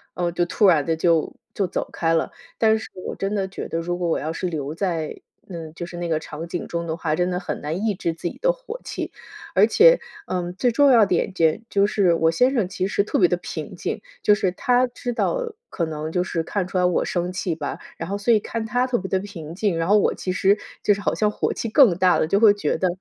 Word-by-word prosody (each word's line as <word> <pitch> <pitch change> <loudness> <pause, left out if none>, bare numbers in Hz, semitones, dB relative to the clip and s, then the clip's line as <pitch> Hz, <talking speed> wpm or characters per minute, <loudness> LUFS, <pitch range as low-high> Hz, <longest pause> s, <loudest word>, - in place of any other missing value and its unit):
嗯， 175 -1 -1
就 175 0 +1
突 200 +4 +3
然 160 -6 +4
地 165 -1 0
就 165 -1 +2 0.2
就 200 - 0
走 180 - -3
开 165 -1 0
了， 165 - +1 0.3
但 220 -1 +4
是 220 - -8 0.2
我 - - -4
真 195 +1 -2
的 195 -2 -1
觉 190 - -7
得 165 - -2
如 175 +1 -2
果 175 -1 -1
我 - - +1
要 155 +2 -3
是 180 - -3
留 155 -3 -4
在， 165 -4 -2 0.3
嗯， 165 -3 -7
就 175 - -5
是 175 0 -9
那 175 0 -3
个 160 -2 0
场 160 +2 -7
景 175 +1 -4
中 170 0 -3
的 160 - -2
话， 155 -2 -1
真 180 +2 0
的 180 - -1
很 180 - -4
难 165 +8 -3
抑 215 - +2
制 170 -2 -2
自 165 - -5
己 - - -12
的 - - +4
火 - - -8
气。 - - -5 0.4
而 - - +5
且 - - +6 0.3
嗯， 180 -1 -3
最 245 +5 +1
重 285 +4 +5
要 235 -5 +6
的 195 - -1
一 - - +4
点 195 - -1
间 165 -1 +2
就 200 0 +3
是 200 -4 +2
我 165 -1 +3
先 250 +10 +3
生 225 -8 +1
其 190 -1 -2
实 200 - +1
特 275 +7 -1
别 360 - +6
地 - - +1
平 - - -7
静， - - -4 0.2
就 210 - +6
是 200 -3 +1
他 250 +4 +2
知 245 0 -5
道 475 - -1 0.2
可 170 - -2
能 155 -1 -4
就 180 - +1
是 170 -2 -2
看 190 +3 -2
出 185 - -4
来 180 - +3
我 180 - +2
生 175 0 -1
气 180 -2 -2
吧， - - -4 0.2
然 165 - -5
后 200 - -1
所 215 +4 +2
以 215 - +4
看 225 +2 -4
他 245 +4 0
特 250 - +1
别 190 0 -5
地 190 - +1
平 175 -6 -8
静， 190 -1 0
然 165 - 0
后 210 - +6
我 205 - +2
其 185 - -3
实 195 +2 +3 0.2
就 205 - +4
是 200 - -5
好 - - 0
像 210 - +1
火 210 - -1
气 - - -4
更 225 - +6
大 185 -1 +4
了， - - +2
就 195 +6 +2
会 215 -2 +7
觉 205 - -1
得 185 - +1
185 Hz, 290 characters per minute, -23 LUFS, 170-210 Hz, 0.4 s, 会